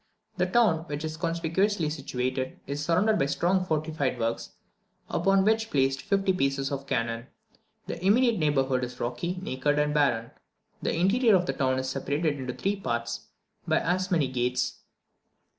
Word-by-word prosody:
The - - +2
town, 180 -10 +3
which 150 0 -4
is 155 0 -4
conspicuously 170 +2 0
situated, 130 -3 -3
is 140 +2 -3
surrounded 185 +7 +2
by 140 - +2
strong 175 +7 +1
fortified 155 -5 -1
works, 115 0 -2 0.5
upon 195 0 +2
which 220 +1 +2
are - - -21
placed 135 -1 +1
fifty 195 -1 +1
pieces 135 -5 0
of 140 0 -4
cannon. 115 0 -2 0.6
The - - -6
immediate 230 +3 +4
neighbourhood 135 -4 +1
is 125 0 -6
rocky, 125 +10 -2
naked, 145 -4 -1
and 150 0 +1
barren. 120 -6 +1 0.5
The - - 0
interior 210 +6 +4
of 180 -1 +2
the - - -1
town 130 -1 +1
is 130 0 -2
separated 145 +3 -1
into 130 -1 -4
three 200 +1 -1
parts 115 -9 -3 0.4
by - - +3
as 185 +2 0
many 160 -7 +2
gates. 125 0 -1
150 Hz, 160 wpm, -27 LUFS, 130-185 Hz, 0.6 s, immediate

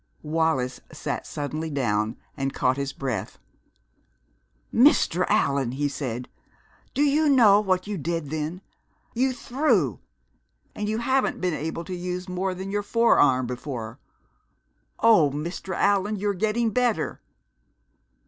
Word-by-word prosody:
Wallis 155 -5 0
sat - - -4
suddenly 155 +2 -4
down 110 -6 -1 0.2
and 135 0 -3
caught 130 0 +2
his 140 0 -3
breath. 125 -8 -4 1.4
"Mr. - - +4
Allan!" 140 -3 +1
he 145 +2 0
said. 125 -4 -4 0.7
"Do 285 - +3
you 295 +1 +3
know 225 -7 +6
what 185 -3 0
you 205 -3 -4
did 165 -1 -3
then? 160 +4 -3 0.5
You 260 +3 +1
threw, 240 - 0 0.7
and 210 0 -3
you 220 - 0
haven't 260 +3 +1
been 180 -2 0
able 160 +2 -4
to 185 - -7
use 180 +1 -4
more 185 +1 -2
than 190 +1 -6
your 205 0 0
forearm 175 - +3
before! 120 -1 -6 1.0
Oh, 215 -10 +5
Mr. 170 +6 -5
Allan, 200 +1 +2
you're 205 0 -1
getting 220 +4 0
better!" 245 -1 0
170 Hz, 130 wpm, -25 LUFS, 140-210 Hz, 1.4 s, know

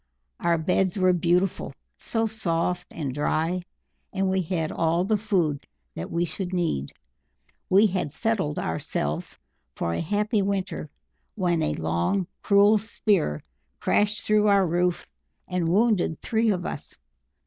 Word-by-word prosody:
Our 170 -1 +2
beds 180 +3 +1
were 185 -1 +4
beautiful 175 +2 +1 0.2
so 225 -1 0
soft 180 -4 -1
and 140 -5 -4
dry 160 +5 0 0.5
and 190 -1 0
we 190 0 +2
had 165 -2 -2
all 165 +2 +1
the 215 +3 +2
food 185 -9 0 0.3
that 80 - -6
we 170 +1 0
should 185 +2 -4
need. 165 - -1 0.8
We 195 +3 +6
had 180 -7 -1
settled 190 -6 -1
ourselves 75 -2 -2 0.4
for 85 - -1
a - - -1
happy 210 +5 +1
winter 195 -5 -2 0.5
when 175 -5 +1
a 155 - 0
long 85 - 0 0.2
cruel 205 +1 +5
spear 200 - 0 0.4
crashed 210 +1 +1
through 210 0 +3
our 200 -2 +5
roof 175 +1 0 0.4
and 180 -2 -1
wounded 200 -4 +2
three 225 0 +1
of 180 -4 0
us. - - -5
180 Hz, 135 wpm, -25 LUFS, 165-205 Hz, 0.8 s, We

